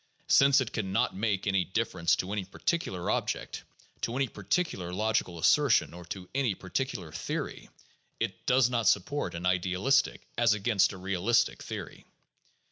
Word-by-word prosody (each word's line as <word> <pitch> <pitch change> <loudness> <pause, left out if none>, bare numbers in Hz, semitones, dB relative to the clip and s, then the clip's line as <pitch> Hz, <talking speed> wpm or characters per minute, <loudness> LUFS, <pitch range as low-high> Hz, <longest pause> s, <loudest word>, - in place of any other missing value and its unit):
Since 140 0 +6
it 120 - -4
can 100 -4 -2
not 100 - +1
make 100 -1 -1
any 100 -2 +2
difference 95 -4 0
to 95 - -4
any 105 -2 -1
particular 95 - -2
object, - - -2 0.4
to 115 - -2
any 135 0 +1
par 100 - -11
ticular 100 - -1
logical 105 -4 0
assertion, 135 - +3
or 90 0 -10
to 90 +1 -7
any 130 -7 +1
particular 95 - -4
theory, - - -5 0.5
it - - -4
does 125 -1 +5
not 120 -3 0
sup 100 - +4
port 145 -10 -3
an 85 +1 -4
idealistic 90 +9 +1
as 115 -3 +4
against 100 -2 +2
a - - -8
realistic 95 +4 +1
theory. - - -7
100 Hz, 160 wpm, -29 LUFS, 90-120 Hz, 0.5 s, Since